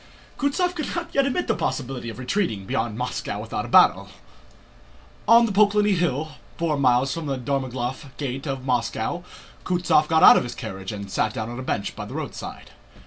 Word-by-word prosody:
Kutúzov 350 +6 +1
could 305 -4 -4
not 340 -1 -4
yet 275 0 +3
admit 355 +7 -1
the - - +2
possibility 125 -3 -3
of 110 - -8
retreating 125 - -1
beyond 110 +1 -2
Moscow 125 +1 -3
without - - -4
a - - -7
battle. - - +5 1.2
On 235 +2 +7
the 225 - -2
Poklónny 205 0 +4
Hill, 160 -4 0 0.3
four 165 -3 0
miles 130 -1 +2
from 165 -2 -5
the 135 -1 -1
Dorogomílov 130 0 -3
gate 135 0 -4
of 135 -2 -4
Moscow, 125 +6 -1 0.4
Kutúzov 175 -4 +2
got 160 0 +3
out - - +10
of - - +1
his 120 0 -6
carriage 95 0 -6
and 100 -2 -7
sat 110 - 0
down 110 +1 -4
on 120 - -6
a - - -4
bench 100 -6 -3
by - - -6
the - - -9
roadside. - - -7
135 Hz, 190 wpm, -24 LUFS, 120-180 Hz, 1.2 s, out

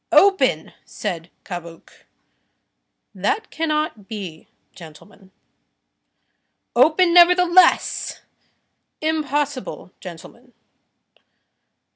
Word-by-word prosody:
"Open!" 270 - +3
said 170 -1 -6 0.2
Cabuc. 170 -3 -9 1.2
"That 445 0 -2
cannot 305 -10 -2
be, 190 -8 -8 0.3
gentlemen." 185 +4 -15 1.5
"Open, 340 +2 +4
nevertheless." 360 +1 +4 0.8
"Impossible, 290 -8 -3
gentlemen." 220 +8 -12
260 Hz, 55 wpm, -21 LUFS, -, 1.5 s, Open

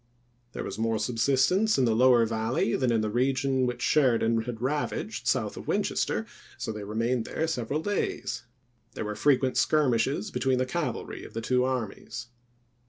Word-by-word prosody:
There - - -4
was - - -6
more 115 0 +1
subsistence 135 - +2
in 130 - +3
the 115 -2 +2
lower 125 -1 +5
Valley 115 +1 0
than 130 -2 +1
in 115 -1 +2
the 110 - -1
region 130 +2 +1
which 125 0 -3
Sheridan 115 -5 +3
had 120 -2 -5
ravaged 140 +5 -2
south - - +1
of - - -8
Win - - +1
chester; - - -1 0.3
so 130 -3 -3
they 105 -1 -6
remained 115 +3 -1
there 160 - -2
several 150 0 -2
days; 195 - -2 0.5
there - - -3
were 105 - -3
frequent 130 +2 +2
skirmishes 140 - +2
between 130 -1 +1
the 130 - +1
cav 155 +4 -2
alry - - -7
of - - -11
the 115 - -2
two 125 +2 +2
armies. 120 -1 -4
125 Hz, 175 wpm, -28 LUFS, 115-135 Hz, 0.5 s, lower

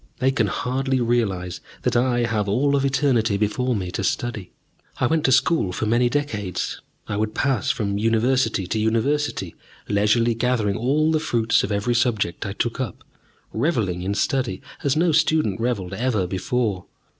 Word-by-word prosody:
They 130 +1 +2
can 115 -5 +1
hardly 130 +5 -1
realize 105 -7 -1 0.2
that - - 0
I 120 0 +2
have 110 -4 0
all 140 +7 +2
of 140 - +1
eternity 130 -6 +2
before 115 +5 0
me 90 -3 -3
to 95 - -3
study. 110 -2 -2 0.5
I - - +1
went 160 -1 +1
to 130 - +3
school 130 - +3
for 100 - -2
many 120 +3 +2
decades. 120 - -3 0.3
I 100 - -2
would 110 0 -2
pass 135 -9 0
from 100 -3 -1
University 115 -1 +1
to 110 +5 -2
University, 115 +7 0 0.3
leisurely 105 +3 +2
gathering 115 -4 0
all 150 +8 +1
the 155 - +2
fruits 115 -6 +1
of - - -2
every 105 +4 0
subject 115 -7 0
I 100 - -4
took 120 +5 -2
up, 120 -9 -4 0.5
revelling 110 - 0
in 100 +3 -2
study 130 +2 0 0.2
as 140 0 +2
no 165 +2 +3
student 155 - +2
revelled 110 -6 -2
ever 110 -3 0
before. 95 +1 -1
115 Hz, 165 wpm, -23 LUFS, 105-130 Hz, 0.5 s, to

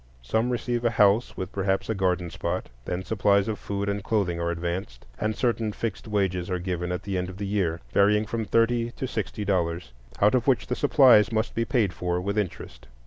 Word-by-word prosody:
Some 110 - 0
receive 120 -1 -1
a 120 - +3
house 105 +1 +3
with 95 0 -4
perhaps 95 -1 -1
a 110 - 0
garden 90 -3 0
spot; 90 +2 -3 0.2
then 90 +1 -3
supplies 100 0 +2
of 110 -2 -3
food 100 0 -3
and 100 -1 -2
clothing 95 -6 0
are 85 0 -1
advanced, 85 -7 -4
and 110 0 -1
certain 115 -3 0
fixed 110 0 -4
wages 95 -4 -1
are 90 - 0
given 90 -1 -3
at 90 +1 -3
the 95 -2 -2
end 90 +1 -3
of 95 - -9
the 100 - -4
year, 95 -5 -1
varying 105 +2 +4
from 115 +1 -3
thirty 115 +2 +2
to - - -4
sixty 105 -2 -4
dollars, 85 -7 -1 0.3
out 105 +1 +4
of 125 -1 +1
which 130 -3 +3
the 125 - -2
supplies 130 -7 +5
must 110 0 -1
be 115 - 0
paid 115 -8 +1
for, 90 -1 -2
with 100 +3 -2
interest. 95 -9 -4
100 Hz, 210 wpm, -26 LUFS, 90-110 Hz, 0.3 s, supplies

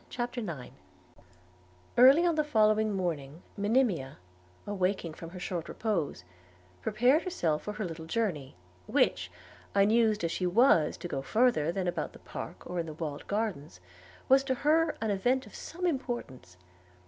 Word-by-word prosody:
CHAPTER 245 0 -3
IX 155 - -6 1.2
EARLY 270 +8 +7
on 340 - +3
the 310 -1 +1
following 215 -5 +3
morning, 160 -4 -3
Monimia, 205 - +1 0.5
awaking 190 -4 -1
from 165 +1 -9
her 180 +1 -9
short 175 -2 -4
repose, 170 - -2 0.6
prepared 255 - +3
herself 170 - -1
for 210 - -5
her 210 -1 -4
little 160 -2 -7
journey, 165 - -2 0.3
which, - - +1 0.4
unused 215 0 +3
as 165 - 0
she 180 - -1
was 180 - +4
to - - -6
go 135 -5 -3
further 170 - +2
than 185 0 -2
about 175 - -2
the - - -12
park - - -8
or 180 0 -3
in 165 - -3
the 155 - -6
walled 150 -3 -5
gardens, 195 - -3 0.5
was 270 +1 +5
to 260 -1 0
her 310 +4 +2
an 220 -1 0
event 245 +7 +1
of - - -15
some 360 +2 -6
importance. 240 - -4
200 Hz, 155 wpm, -30 LUFS, 165-245 Hz, 1.2 s, EARLY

